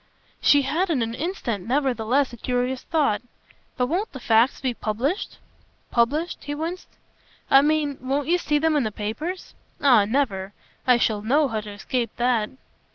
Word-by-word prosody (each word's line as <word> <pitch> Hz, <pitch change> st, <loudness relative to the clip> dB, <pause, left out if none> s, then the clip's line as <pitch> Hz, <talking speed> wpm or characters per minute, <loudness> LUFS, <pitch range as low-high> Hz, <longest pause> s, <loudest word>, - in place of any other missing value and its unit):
She 285 Hz, -1 st, +5 dB
had 335 Hz, +8 st, 0 dB
in 275 Hz, -8 st, +1 dB
an 225 Hz, 0 st, -3 dB
instant 245 Hz, -, -3 dB
nevertheless 260 Hz, 0 st, +1 dB
a -, -, -8 dB
curious 250 Hz, +2 st, -1 dB
thought. 290 Hz, -11 st, +1 dB, 0.6 s
"But 250 Hz, -, +2 dB
won't 360 Hz, -, -2 dB
the 265 Hz, -, -7 dB
facts 230 Hz, +1 st, +3 dB
be 260 Hz, -2 st, -1 dB
published?" 240 Hz, -, -2 dB, 0.5 s
"'Published'?" 285 Hz, +9 st, 0 dB
he 290 Hz, +1 st, -3 dB
winced. 335 Hz, +4 st, -4 dB, 0.6 s
"I 270 Hz, -, +8 dB
mean 295 Hz, -1 st, +1 dB
won't 275 Hz, +3 st, -1 dB
you 350 Hz, +2 st, +3 dB
see 295 Hz, -3 st, +1 dB
them 315 Hz, +1 st, +2 dB
in 295 Hz, -, +3 dB
the 215 Hz, -, -2 dB
papers?" 235 Hz, -, -5 dB, 0.3 s
"Ah 255 Hz, -8 st, +5 dB
never! 205 Hz, -5 st, -1 dB, 0.3 s
I 250 Hz, -1 st, +6 dB
shall 220 Hz, -3 st, +1 dB
know 280 Hz, +7 st, +3 dB
how 220 Hz, -2 st, -2 dB
to 210 Hz, -, -9 dB
escape 235 Hz, +3 st, -2 dB
that." 240 Hz, -3 st, +1 dB
260 Hz, 165 wpm, -24 LUFS, 230-295 Hz, 0.6 s, I